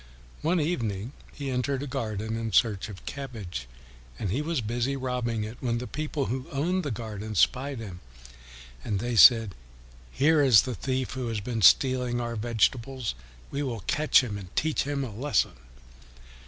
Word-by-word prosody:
One 170 +3 +2
evening 115 - -2 0.2
he 140 -2 -5
entered 130 +2 -1
a - - -3
garden 110 -5 -3
in 115 -2 -3
search 105 -3 +2
of 95 -3 -10
cabbage, 110 - -6 0.5
and 95 - -3
he 130 +8 0
was 160 0 -1
busy 120 +4 -1
robbing 125 -4 -2
it, 110 +3 -7
when 120 -2 -1
the 125 - -4
people 150 0 -3
who 130 +2 -3
owned 175 +7 0
the 145 - -2
garden 110 -2 -5
spied 135 +8 +2
him. 100 -6 -7 0.8
And 105 - -1
they 120 +4 -2
said, 110 -1 +7 0.6
"Here 150 +3 +3
is 125 -7 +7
the 130 - -3
thief 130 +4 -2
who 130 -3 -4
has 115 -2 -2
been 115 +2 -3
stealing 125 +3 +4
our 120 -1 -3
vegetables. 120 +2 0 0.4
We 140 - -2
will 120 -6 -3
catch 150 +7 +3
him 105 -5 -4
and 95 -2 -12
teach 155 -2 +1
him 140 -1 -2
a 120 -5 -6
lesson." 140 +6 +1
120 Hz, 170 wpm, -27 LUFS, 110-135 Hz, 0.8 s, said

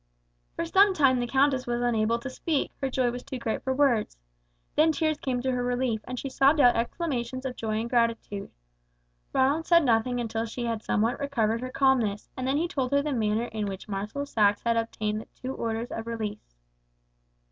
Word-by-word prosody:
For 335 - -2
some 385 +3 +4
time 265 -5 +4
the 245 - -1
countess 265 0 +2
was 240 0 -1
unable 230 -1 +2
to 235 +3 -6
speak, 300 +2 -1
her 270 - 0
joy 255 -2 +1
was 245 +1 -6
too 270 0 -6
great 225 -2 -2
for 265 - -2
words. 260 - +2 0.6
Then 315 +1 +5
tears 310 -1 0
came 250 -2 -2
to 260 - +1
her 250 -1 -1
relief, 245 -3 0
and 250 +1 -5
she 275 - -4
sobbed 275 +3 +3
out 245 -3 +6
exclamations 255 0 -2
of 255 -1 -3
joy 215 -1 -2
and 230 - -3
gratitude. 230 -4 0 0.8
Ronald 285 +5 +2
said 335 -3 +5
nothing 245 +1 +2
until 225 -1 -2
she 240 +2 -4
had 230 -2 -2
somewhat 220 +2 0
recovered 230 -5 0
her 255 - -4
calmness, 255 -6 +1
and 255 0 -3
then 270 +2 +2
he 335 +3 +1
told 265 -6 -2
her 280 0 +3
the 300 -1 -1
manner 220 -1 0
in 215 -3 -4
which 195 +1 -6
Marshal 210 +8 -3
Saxe 205 -6 +2
had 235 -1 +2
obtained 215 -2 -2
the - - -14
two 260 +1 -4
orders 230 0 -3
of 225 0 -5
release. 210 - -5
245 Hz, 200 wpm, -27 LUFS, 225-270 Hz, 0.8 s, out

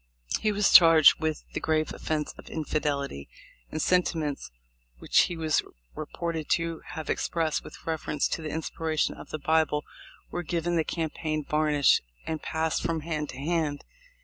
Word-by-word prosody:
He 215 - +1
was 205 -1 +2
charged 165 -3 +8
with 155 -1 -2
the - - -2
grave 155 -1 0
offence 155 -2 -2
of - - -13
infidelity, 140 - -2 0.4
and 155 - -3
sentiments 160 -4 0 0.5
which - - +4
he 175 - -5
was 155 -2 +2 0.3
reported 160 0 -4
to 165 -1 -4
have 160 0 -5
expressed 160 -2 -1
with - - -12
reference 160 -2 -1
to - - -2
the 155 - -4
inspiration 160 0 -1
of - - -12
the - - -3
Bible 155 -1 +1 0.5
were 175 - -2
given 175 +1 -1
the 165 - +2
campaign 155 -2 -3
varnish 150 -2 +3 0.2
and 160 -1 -3
passed 160 0 -1
from 165 -1 -1
hand 150 -2 -3
to 125 - -8
hand. 150 0 -1
160 Hz, 155 wpm, -27 LUFS, 150-165 Hz, 0.5 s, charged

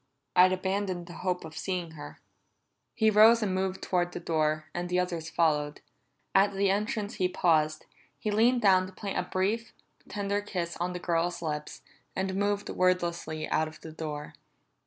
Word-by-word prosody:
"I'd 185 +1 +7
abandoned 185 -1 -1
the 175 - -10
hope 180 -2 -1
of 160 0 -10
seeing 180 -3 -3
her." 155 -2 -10 0.8
He 220 -1 +4
rose 220 +2 +7
and 195 -3 0
moved 190 0 -2
toward 175 -1 0
the - - -4
door, 155 -2 0
and 175 0 -3
the 180 - +1
others 170 -3 -2
followed. 150 -3 +1 0.5
At 200 +1 +4
the 195 0 +2
entrance 210 +1 -2
he 185 -2 +2
paused; 155 -4 +2 0.3
he 215 - -2
leaned 235 +4 +3
down 185 -2 +5
to 190 - -12
plant 195 0 -3
a 180 - -4
brief, 215 +5 -1 0.4
tender 200 0 -1
kiss 180 -4 -4
on 180 +1 -2
the 180 - -4
girl's 170 0 -1
lips, 150 -1 -4 0.3
and 190 0 -1
moved 205 +1 0
wordlessly 175 -4 0
out 155 - +1
of 155 - -12
the 160 - -8
door. 150 -2 -6
180 Hz, 175 wpm, -29 LUFS, 165-200 Hz, 0.8 s, I'd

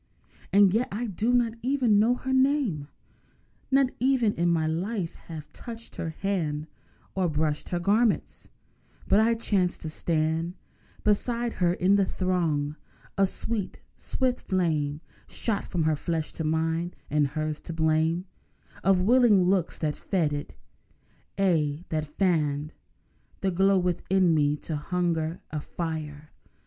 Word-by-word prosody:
And 195 -1 +6
yet 235 +4 +2
I 225 +4 -2
do 220 +3 0
not 240 -2 +2
even 250 -5 +3
know 235 +4 +4
her 265 +1 -3
name, 260 - +2 0.8
Nor 270 0 +5 0.2
ever 260 -2 +3
in 175 -5 +2
my 165 -2 +2
life 175 +3 -2
have 155 -3 -10
touched 230 -1 -9
her 165 - -3
hand 160 -4 -2 0.5
Or 185 -2 +1
brushed 150 -1 -1
her 175 - -1
garments. 210 +5 +1 0.6
But 200 - +5
I 230 +1 +4
chanced 195 -5 0
to 155 - -5
stand 160 +2 -1 0.5
Beside 235 +3 +1
her 175 -1 +4
in 195 +3 +3
the 200 - +3
throng! 160 -6 -1 0.4
A 195 -1 +3
sweet, 215 +1 -3 0.2
swift 255 -1 -2
flame 155 -5 0 0.3
Shot 220 -4 -1
from 170 -3 -1
her 155 0 +2
flesh 160 +1 -2
to 160 - -4
mine—and 160 -1 0
hers 155 +1 -3
the - - -8
blame 160 +2 +1 0.6
Of 190 -1 +4
willing 230 -3 +5
looks 180 -1 +1
that 150 -2 -1
fed 165 -7 0
it; 145 0 -5 0.8
aye, 165 -5 +1
that 155 -1 -1
fanned 150 -3 0 0.7
The 195 - +1
glow 195 +2 +3
within 180 0 +2
me 150 -1 +2
to 160 - -5
a - - -1
hungry 170 0 -1 0.2
fire. 155 -2 -5
175 Hz, 140 wpm, -27 LUFS, 155-205 Hz, 0.8 s, And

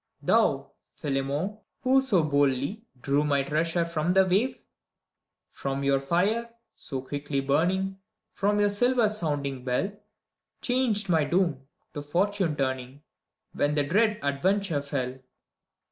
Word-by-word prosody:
Thou, - - +2 0.2
Philemon, 145 +9 -2 0.2
who 265 0 +4
so 210 -11 +2
boldly 145 - 0
Drew 140 +3 +1
my 140 -2 +1
treasure 165 +4 0
from 170 0 -2
the 190 +1 +5
wavef 200 +8 +1 0.9
From 135 0 -3
your 140 0 +3
fire, 195 +11 0 0.2
so 135 -4 -6
quickly 145 +1 -3
burning, 180 +8 0 0.3
From 205 +1 +1
your 205 0 +4
silver 245 +2 +3
sounding 145 -10 -2
bell. 130 +10 0 0.7
Changed 245 -5 +1
my 165 -4 +3
doom, 145 -4 0 0.3
to 145 - -4
fortune 180 +2 0
turning, 130 0 -3 0.5
When 145 +1 +1
the 145 - +2
dread 210 +8 +2
adventure 160 +3 +1
fell. 130 -3 -3
160 Hz, 125 wpm, -27 LUFS, 140-200 Hz, 0.9 s, the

